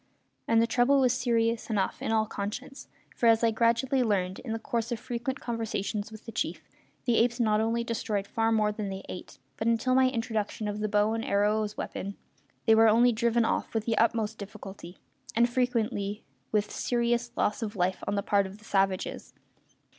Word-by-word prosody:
And 230 0 +4
the 230 - +4
trouble 245 +4 +3
was 255 -2 +4
serious 235 -2 0
enough, 205 -4 -1
in - - -1
all 220 -1 +3
conscience, 215 +7 -6 0.3
for 235 - +2
as 225 0 +5
I 230 - +4
gradually 235 +4 +2
learned, 190 -5 0
in 245 - -6
the 225 - -1
course 230 +1 -3
of 235 - -2
frequent 245 +4 -4
conversations 220 -2 -3
with 220 0 -11
the 225 - -7
chief - - -3 0.4
the 240 -3 +3
apes 235 +1 +2
not 215 -2 +3
only 230 +1 0
destroyed 215 -3 -2
far 225 +2 0
more 215 -1 +2
than 210 -1 -4
they 190 0 -6
ate, 180 - -8 0.2
but, 220 - -2
until 230 +2 +2
my 260 0 +5
introduction 220 -3 -2
of 205 0 -3
the 215 0 -1
bow 210 +1 +2
and 225 0 -2
arrow 210 +1 +2
as 210 -1 -3
a - - -31
weapon, 200 +1 -5 0.5
they 225 - +6
were 225 0 +6
only 240 +3 +5
driven 235 0 +2
off - - -1
with 220 -1 0
the 230 - +1
utmost 225 -1 +1
difficulty, 195 -3 -9 0.4
and 235 +1 +5
frequently 225 -5 -1 0.3
with 210 -1 +1
serious 240 0 0
loss 210 - 0
of 215 -1 -4
life 185 0 0
on 205 - 0
the 200 - -1
part 200 -2 +2
of 190 +2 -11
the 215 - -19
savages. 195 -2 -1
225 Hz, 200 wpm, -28 LUFS, 210-235 Hz, 0.5 s, they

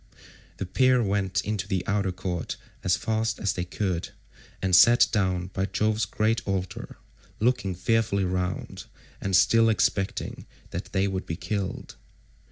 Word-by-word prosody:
The 95 - -3
pair 130 +6 +3
went 100 -1 0
into 105 -2 -2
the 95 -3 -1
outer 100 -2 0
court 90 -2 -4 0.3
as 90 - +2
fast 110 0 -1
as 100 - 0
they 90 - -3
could, 90 -2 -2 0.5
and 95 -1 +2
sat 115 +7 +7
down 95 -3 0
by 95 0 -1
Jove's 110 0 0
great 110 +4 0
altar, 95 -2 -3 0.4
looking 115 -5 +1
fearfully 105 0 +1
round, 90 0 -3 0.4
and 95 -1 0
still 115 +5 +5
expecting 100 -2 -1 0.2
that - - -4
they 95 +1 +2
would 95 -1 -3
be 80 - -2
killed. 100 +1 -4
95 Hz, 145 wpm, -26 LUFS, 95-110 Hz, 0.5 s, sat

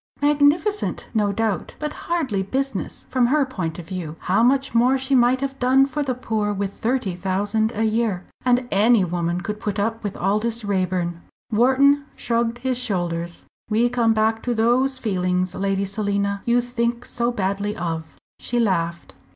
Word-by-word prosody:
"Magnificent, 295 +8 +2
no 210 -3 +2
doubt, 215 -2 -2
but 300 0 -4 0.2
hardly 280 - 0
business, 270 +8 -3
from 250 -2 +3
her 290 +2 +3
point 185 - -4
of 170 -2 -9
view. 175 -5 -5
How 195 +4 +2
much 270 +3 +2
more 245 +3 +4
she 265 +1 -2
might 250 +1 +4
have 275 -1 -3
done 260 +2 +4
for 280 +2 -3
the 265 -3 -1
poor 220 -4 -1
with 200 0 -3
thirty 235 -5 -1
thousand 200 +4 0
a 220 - 0
year! 220 -4 0 0.2
And 250 0 +2
any 210 +1 +4
woman 175 0 -1
could 210 +2 -4
put 210 -1 -3
up 225 +3 -1
with 205 -2 -4
Aldous 215 +4 0
Raeburn." 185 -3 -1 0.3
Wharton 270 +5 +4
shrugged 235 0 0
his 255 0 -1
shoulders. 175 -7 -3 0.2
"We 230 +3 +3
come 230 -2 +2
back 220 +1 +1
to 245 -1 -1
those 250 +4 +2
feelings, 185 -5 -1
Lady 195 0 0
Selina, 200 0 -1
you 240 +1 +3
think 240 0 -2
so 235 0 -1
badly 200 -1 -2
of." 165 -2 -4 0.2
She 240 - -1
laughed. 170 -6 -1
225 Hz, 165 wpm, -22 LUFS, 195-250 Hz, 0.3 s, more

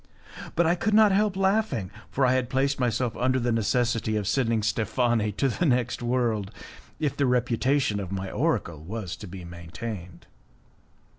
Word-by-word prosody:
But 170 - +3
I 165 - +4
could 210 +4 0
not 215 -1 +6
help 200 0 +2
laughing, 195 - +1 0.2
for 135 - +1
I 125 - +4
had 130 -1 0
placed 135 +1 +1
myself 120 -1 0
under 130 +1 +2
the 120 0 0
necessity 115 0 +1
of 105 -2 -1
sending 115 -2 +1
Steffani 115 0 +1
to 135 - +1
the 160 +7 0
next 125 -3 +1
world, 120 -5 0 0.5
if 150 -3 -1
the 140 -1 +1
reputation 125 -1 +1
of 95 -2 -5
my 95 0 -4
oracle 80 -3 -1
was 95 +1 -5
to 105 - -9
be 90 0 -8
maintained. 85 +1 -8
120 Hz, 165 wpm, -26 LUFS, 105-135 Hz, 0.5 s, not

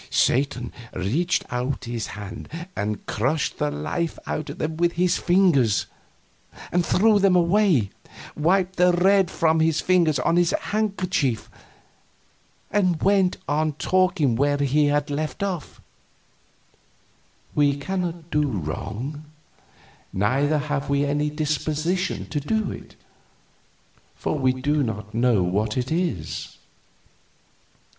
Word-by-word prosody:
Satan 125 -2 +1 0.2
reached 140 - 0
out 125 +2 -2
his 120 -2 -4
hand 105 +2 -8 0.3
and 105 0 -3
crushed 135 +8 -1
the 75 - +1
life 75 - -3
out 155 - -3
of - - -7
them 155 +1 -3
with 170 0 +2
his 180 0 +1
fingers, 175 - +3 0.9
threw 205 +4 +4
them 195 -2 +4
away, 175 - +3 0.4
wiped 185 +4 +1
the 180 0 +5
red 190 +1 +4
from 160 -1 +2
his 160 -1 +2
fingers 170 -5 +3
on 165 +7 +1
his 175 -1 +3
handkerchief, 190 - -1 1.2
and 185 -5 +2
went 195 -2 +3
on 155 +1 +1
talking 180 -5 +1
where 145 +3 +2
he 145 +1 +2
had 145 0 0
left 155 +6 -3
off: 185 -5 -4 1.7
"We 145 -1 +2
cannot 170 +1 -4
do 150 0 +2
wrong; 110 - -4 0.9
neither 135 +10 +1
have 145 -1 -2
we 140 0 +2
any 145 +1 0
disposition 155 +4 -1
to 150 - -1
do 215 +7 -1
it, - - -10 1.2
for - - -2
we 130 -1 +3
do 145 +4 0
not 105 -4 -4
know 115 -4 +3
what 105 +5 -1
it 125 +2 -2
is." 160 - -3
150 Hz, 120 wpm, -24 LUFS, 130-180 Hz, 1.7 s, the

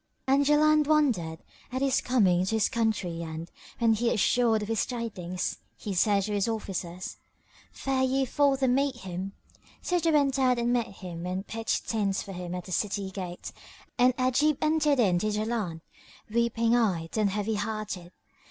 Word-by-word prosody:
And 275 +2 +4
Jaland 305 0 +4
wondered 235 - +1 0.3
at 260 +2 -1
his 270 -1 +2
coming 190 -8 +3
to 225 - 0
his 220 - +2
country 210 -7 -1
and, 165 +1 -6 0.3
when 230 -1 +3
assured 230 0 +2
of - - -5
the 225 - -1
tidings, 200 -6 -3 0.2
he 205 - -5
said 200 +2 +3
to 210 - -3
his 200 0 +1
officers, 190 -5 -4 0.5
"Fare 270 -1 -1
ye 265 +1 +2
forth 275 +1 +2
and 250 -1 +4
meet 275 0 +1
him." 190 -2 -6 0.5
So 355 0 +1
they 330 0 +1
went 280 -3 +2
out 255 -2 +3
and 240 +1 +1
met 240 -3 +1
him 180 -3 -7
and 185 +2 -3
pitched 225 +2 -2
tents 200 -4 0
for 195 - -8
him 180 -1 -5
at 180 - -5
the 185 - -9
city 195 +1 -1
gate; 180 -2 -6 0.5
and 250 0 +5
Ajib 260 +3 +2
entered 305 -3 +2
in 185 -7 +3
to 215 - -1
Jaland, 210 -6 -2 0.5
weeping 230 0 +2
eyed 180 -9 0
and 215 -2 +2
heavy 210 +2 -1
hearted. 205 -4 -4
220 Hz, 170 wpm, -28 LUFS, 190-255 Hz, 0.5 s, and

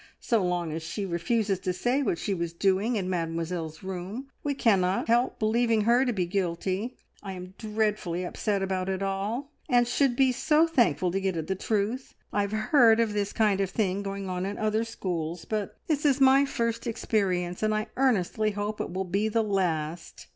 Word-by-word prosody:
So 230 -5 +1
long 175 -2 -1
as 160 +1 -4
she 195 +5 -4
refuses 195 +3 0
to 185 - -1
say 245 +9 +1
what 205 -10 0
she 200 - -2
was 170 -2 -3
doing 195 +6 +1
in 195 -4 -1
Mademoiselle's 165 -2 -3
room 190 +8 -5
we 285 -1 -1
cannot 195 -7 +2
help 240 +2 +2
believing 225 0 +2
her 240 +5 +4
to 250 - +1
be 190 -6 0
guilty. 190 +4 -2 0.2
I 195 -2 -6
am 185 0 -9
dreadfully 210 -5 -1
upset 200 +2 -1
about 190 -1 -1
it 190 0 -2
all, 205 +9 -2 0.2
and 245 -2 +4
should 255 0 +2
be 265 0 +4
so 305 +5 +3
thankful 225 - +2
to 195 +2 -1
get 190 -3 -1
at 160 - -2
the 190 - -1
truth. 215 +6 -2 0.2
I 205 - +2
have 200 0 -2
heard 225 +1 +4
of 225 -2 +1
this 205 -1 -1
kind 210 -3 +2
of 195 - 0
thing 195 -2 0
going 195 -1 -4
on 180 0 -2
in 200 +2 -3
other 215 +1 0
schools, 170 -6 -4
but 215 -3 -3
this 300 -3 0
is 280 -2 +3
my 270 +1 +6
first 230 -2 -2
experience, 185 -6 -1
and 215 0 +2
I 215 0 0
earnestly 220 -4 +2
hope 205 +1 -3
it - - -4
will 190 +2 -2
be 200 +4 0
the 225 +1 +1
last. 170 -5 -2
200 Hz, 200 wpm, -27 LUFS, 185-230 Hz, 0.2 s, my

